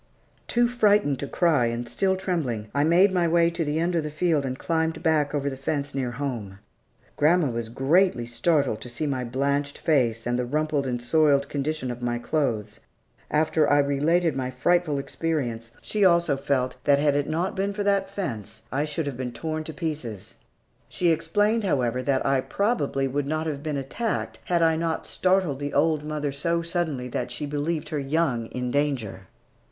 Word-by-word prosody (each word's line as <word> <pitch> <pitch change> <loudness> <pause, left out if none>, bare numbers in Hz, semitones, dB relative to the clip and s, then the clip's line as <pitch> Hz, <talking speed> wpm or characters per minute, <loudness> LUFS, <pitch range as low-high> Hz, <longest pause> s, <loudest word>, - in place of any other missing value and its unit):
Too 240 0 +3
frightened 210 - +2
to 140 - -3
cry, 155 -7 +2
and 120 +1 -3
still 190 +8 +1
trembling, 140 - -2
I 140 +2 +2
made 175 +5 +5
my 180 -2 +2
way 170 0 +3
to 170 0 -2
the 150 0 -1
end 170 +2 0
of 170 - +2
the 150 - -4
field 150 -2 +1
and 130 0 -4
climbed 160 +1 -1
back 150 -3 +2
over 140 -1 -1
the 135 - -2
fence 140 +1 -3
near 130 -3 -1
home. 120 -7 -4 0.6
Grandma 155 -1 +3
was 115 -1 -4
greatly 135 +2 +2
startled 120 -1 0 0.2
by 155 - 0
my 130 -3 -1
blanched 140 +3 -1
face, 120 -7 +1
and 120 +1 0
the 125 - 0
rumpled 150 0 0
and 125 -1 -1
soiled 140 +2 +3
condition 145 -2 -2
of 120 0 -7
my 120 -1 -1
clothes. 120 -6 -2 0.5
After 155 0 +2
I 145 - +5
related 150 +3 +2
my 130 -1 -2
frightful 155 +4 +1
experience, 135 -6 -3
she 210 -1 0
also 170 -5 +4
felt 130 -2 -1
that 140 -1 +5
had 145 0 +2
it 145 0 0
not 175 +5 -1
been 195 +1 0
for 205 0 -3
that 200 -1 +1
fence, 115 - -5
I 145 +3 0
should 155 +1 -2
have 140 -4 -4
been 125 -1 -3
torn 155 +6 -4
to 160 - -5
pieces. 145 - -5 0.6
She 175 -2 +1
explained, 210 +7 +1
however, 125 - 0
that 135 0 0
I 135 -1 +2
probably 145 - 0
would 140 +1 -2
not 155 +2 -1
have 145 -3 -3
been 150 -2 -2
attacked 210 - -3
had 170 -2 +2
I 160 -1 +3
not 165 0 -2
startled 185 -7 +1
the 145 0 -4
old 155 0 +2
mother 150 -1 -2
so 170 +4 -1
suddenly 165 -7 -2
that - - -3
she - - -4
believed 150 +3 -2
her 150 - -2
young 135 -5 0
in 125 0 -4
danger. 130 -10 -1
145 Hz, 190 wpm, -25 LUFS, 130-165 Hz, 0.6 s, made